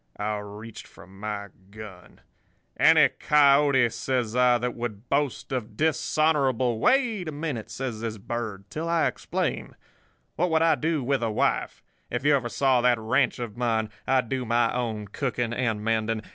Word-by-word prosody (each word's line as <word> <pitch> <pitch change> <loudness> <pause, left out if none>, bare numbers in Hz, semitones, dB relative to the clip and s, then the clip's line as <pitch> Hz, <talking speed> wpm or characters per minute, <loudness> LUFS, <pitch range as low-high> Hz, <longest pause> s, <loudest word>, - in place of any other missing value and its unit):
"I 105 +1 -2
reached 105 +2 -10
for - - -15
my 100 +2 -6 0.2
gun. 105 -4 -12 0.5
"'Any - - +6
coyote,' 140 -4 +4
says 125 -4 -2
I, 125 -1 +4
'that 125 0 -2
would 115 -1 -6
boast 140 -2 -1
of 115 -5 -4
dishonourable—' 145 -6 +1
"'Wait 235 - +2
a - - -3
minute,' 145 -7 -4
says 115 -1 -5
this 115 -1 -4
Bird, 105 -2 -5
'till 165 +2 -4
I 170 -1 +2
explain. - - -3 0.6
What 180 +2 +1
would 160 0 +2
I 165 - +5
do 160 -3 -1
with 135 +1 0
a 115 - 0
wife? 105 - -1 0.3
If - - -3
you 150 0 +5
ever 125 -3 -1
saw 130 -1 +2
that 125 -1 +3
ranch 125 +5 +1
of 120 -4 -6
mine! 110 -3 0 0.2
I 130 -1 +3
do 125 +2 -3
my 120 0 +1
own 110 -4 -3
cooking 120 +1 -2
and 110 -4 -1
mending. 110 0 0
120 Hz, 165 wpm, -26 LUFS, 110-140 Hz, 0.6 s, Any